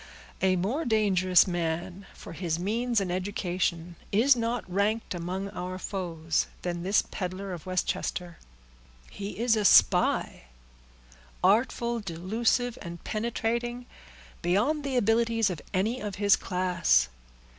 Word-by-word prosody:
A 190 -1 +3
more 215 - -1
dangerous 195 - +4
man, 175 +2 -3
for - - -10
his 165 -2 -2
means 230 +6 0
and 190 -3 -2
education, 180 -2 -2
is 245 +7 +5
not 235 0 -2
ranked 200 +5 0
among 185 +3 -4
our 180 +1 -5
foes 165 -5 -2 0.2
than 175 -1 -3
this 195 +4 +2
peddler 185 +1 -4
of 175 0 -9
Westchester. 180 -1 -2 0.7
He 200 0 -6
is 230 0 +2
a 215 - 0
spy—artful, - - +1
delusive, 220 +6 -1
and 170 0 -8
penetrating, 235 +2 -2 0.6
beyond 210 - +1
the 270 -2 -1
abilities 225 -1 +2
of 170 - -6
any 220 +7 0
of 205 -2 -4
his 200 0 +4
class. 175 - +1
190 Hz, 120 wpm, -28 LUFS, 175-225 Hz, 0.7 s, is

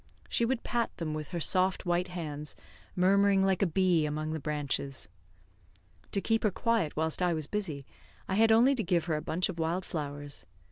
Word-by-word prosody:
She 235 - +2
would 245 0 -1
pat 235 -1 -1
them 160 -3 -3
with 155 -1 -4
her 175 - -4
soft 185 +3 +2
white 175 +1 +1
hands, 150 -4 -5 0.4
murmuring 195 +1 +4
like 190 -2 +2
a 195 - +4
bee 175 -3 +2
among 155 +1 -3
the 160 - -3
branches. 140 -2 -3 1.0
To 200 - +2
keep 225 +3 +1
her 215 - +3
quiet 220 -6 0
whilst 160 +2 0
I 175 -2 +2
was 155 -2 -3
busy, 160 -8 -3 0.4
I - - -2
had 225 +3 +4
only 240 +5 +6
to 240 -5 -1
give 170 -2 +1
her 160 -2 0
a 150 - -2
bunch 165 +3 0
of 175 -3 -6
wild 170 +3 -1
flowers. 145 -2 -5
175 Hz, 195 wpm, -30 LUFS, 155-195 Hz, 1.0 s, only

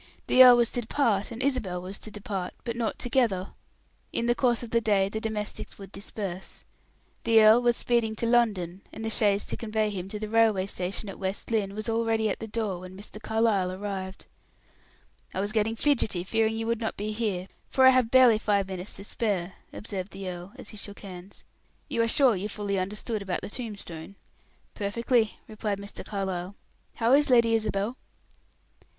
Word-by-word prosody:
The 255 - +8
earl 250 -1 +9
was 235 -1 +2
to 245 - -1
depart, 220 -4 +1
and 235 +2 -5
Isabel 250 -10 0
was 185 +2 -4
to - - -7
depart, 200 -3 -5
but 235 -2 -3
not 235 -2 -2
together. 230 -7 +1 0.6
In 235 - -1
the 240 - +4
course 240 -1 +1
of 235 - -8
the 230 - +3
day 200 -3 +2
the 220 +2 -4
domestics 215 -2 -4
would 195 -1 -11
disperse. 195 -2 -7 0.6
The 225 -1 +6
earl 220 +3 +7
was 240 -1 +2
speeding 235 -2 +1
to 230 - -2
London, 205 -7 +1
and 220 - -7
the 225 - -1
chaise 205 -2 +2
to - - -4
convey 215 -1 -1
him 190 -1 -5
to 210 - -5
the 215 0 -4
railway 220 -3 +3
station 195 +2 -3
at 195 - -8
West 190 +4 -4
Lynne 200 -3 0
was 215 0 -4
already 225 -1 +1
at - - -4
the 225 - -6
door 210 -4 -2
when 185 +1 -10
Mr. 210 +1 -7
Carlyle 215 -4 +1
arrived. 190 0 -5 1.1
"I - - -1
was 205 +2 0
getting 220 0 +1
fidgety 230 -9 +1
fearing 220 +3 +1
you 225 - -2
would 230 0 -1
not 220 - -3
be 210 +1 -3
here, 210 -5 -2 0.2
for 260 - +4
I 260 - +10
have 255 -3 +3
barely 250 -3 +6
five 200 -3 +1
minutes 185 0 -5
to 195 - -8
spare," 195 -4 -2 0.2
observed 195 -3 -6
the 195 -1 -6
earl, 180 +1 -7
as - - -9
he 215 - -10
shook 200 0 -8
hands. 190 -1 -9 0.5
"You 230 - +1
are 230 - +2
sure 250 -1 +4
you 195 +3 -3
fully 200 -2 -2
understood 210 +3 -2
about 190 -2 -3
the - - -7
tombstone?" 200 -7 -6 0.6
"Perfectly," 225 +2 0
replied 215 -2 -3
Mr. 200 +1 -8
Carlyle. 190 -2 -4 0.4
"How 230 +2 +2
is 290 +1 +5
Lady 235 -2 +5
Isabel?" 215 +1 0
215 Hz, 195 wpm, -27 LUFS, 195-230 Hz, 1.1 s, I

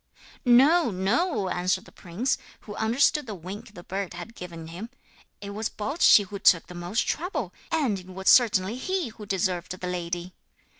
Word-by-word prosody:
'No, 275 +6 +5
no,' 200 - 0
answered 185 +1 0
the - - -16
prince, 205 +10 -2 0.2
who 205 - -9
understood 250 +6 +2
the 215 - -5
wink 195 +4 -9
the 175 - -10
bird 190 -1 -4
had 175 +7 -8
given 170 -5 -8
him; 175 +8 -8 0.5
'it 200 0 -6
was 215 +2 -3
Baldschi 220 -1 +4
who 200 +1 -7
took 170 -4 +5
the 180 - -11
most 175 +5 -2
trouble, 310 - -2 0.2
and 270 -12 +1
it 180 - -14
was 190 +1 -8
certainly 215 -3 +5
he 370 0 -2
who 215 -1 -11
deserved 185 -2 -2
the 180 - -4
lady.' 175 0 -4
200 Hz, 170 wpm, -26 LUFS, 180-240 Hz, 0.5 s, No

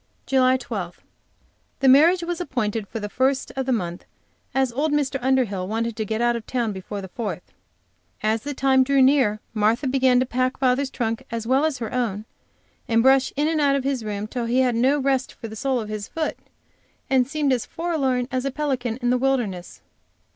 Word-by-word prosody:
JULY 260 -1 +3
12. 205 -8 -6 0.8
The 270 - +3
marriage 325 +7 +6
was 345 0 -3
appointed 225 - -2
for 225 - -5
the 210 - -4
first 260 +5 0
of 265 -1 -3
the - - +1
month, 175 -7 -2 0.5
as 265 -2 +1
old 290 +6 0
Mr. 285 -2 0
Underhill 240 -8 +1
wanted 225 +2 -2
to 220 -1 -3
get 220 +2 -2
out 240 0 +2
of 230 -1 -6
town 240 -4 -1
before 200 +2 -6
the 190 - -7
Fourth. 220 +3 -6 0.7
As 220 +1 +1
the 290 +2 -5
time 265 0 +4
drew 275 +1 +2
near, 260 -6 +4
Martha 220 +5 +1
began 260 -1 +3
to 255 - +2
pack 255 +1 -1
father's 265 +1 +1
trunk 225 -3 -3
as 230 -1 -4
well 265 +5 +3
as 310 -4 -1
her 230 -3 -5
own, 220 -4 -2 0.6
and 230 0 +3
brush 265 0 +4
in 295 +1 +1
and 315 -1 +1
out 280 -1 +3
of 275 - -1
his 270 -3 -1
room 210 -1 -3
till 235 +2 -4
he 245 +3 +2
had 250 -2 +2
no 255 +5 +3
rest 265 -2 0
for 230 - -8
the 220 - -9
sole 260 +3 0
of 215 - -5
his 215 -1 -5
foot, 320 -1 -3 0.7
and 260 -2 +2
seemed 290 -2 0
as 245 - -2
forlorn 275 -8 -1
as 255 -1 -1
a 275 - -1
pelican 255 -5 -2
in 245 - +2
the 250 - +2
wilderness. 240 -9 -2
255 Hz, 205 wpm, -23 LUFS, 225-270 Hz, 0.8 s, marriage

